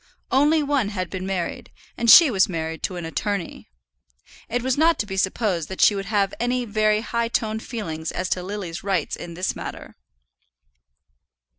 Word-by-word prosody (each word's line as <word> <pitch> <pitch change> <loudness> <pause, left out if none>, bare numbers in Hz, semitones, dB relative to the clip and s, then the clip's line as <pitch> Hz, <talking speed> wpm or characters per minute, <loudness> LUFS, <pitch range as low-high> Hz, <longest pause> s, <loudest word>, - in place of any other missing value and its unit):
Only 295 +3 +4
one 280 -7 0
had 185 -4 -4
been 185 0 -4
married, 185 -3 -4 0.2
and 235 - 0
she 310 +3 +9
was 195 -3 +3
married 160 -2 -4
to 185 - -3
an 175 -2 -5
attorney. 195 - -4 0.8
It 245 +1 -1
was 260 0 +1
not 325 +3 +3
to - - -1
be 190 -2 -6
supposed 190 -3 0
that 190 - -7
she - - +6
would 195 -1 -4
have 200 -2 +1
any 245 +1 0
very 215 -1 +1
high 235 0 -1
toned 220 -1 -1
feelings 160 -10 -5
as 180 - -3
to 180 - -1
Lily's 185 -3 -5
rights 195 -1 -1
in 170 -1 -9
this 185 +2 -2
matter. - - -8
205 Hz, 175 wpm, -23 LUFS, 185-235 Hz, 0.8 s, she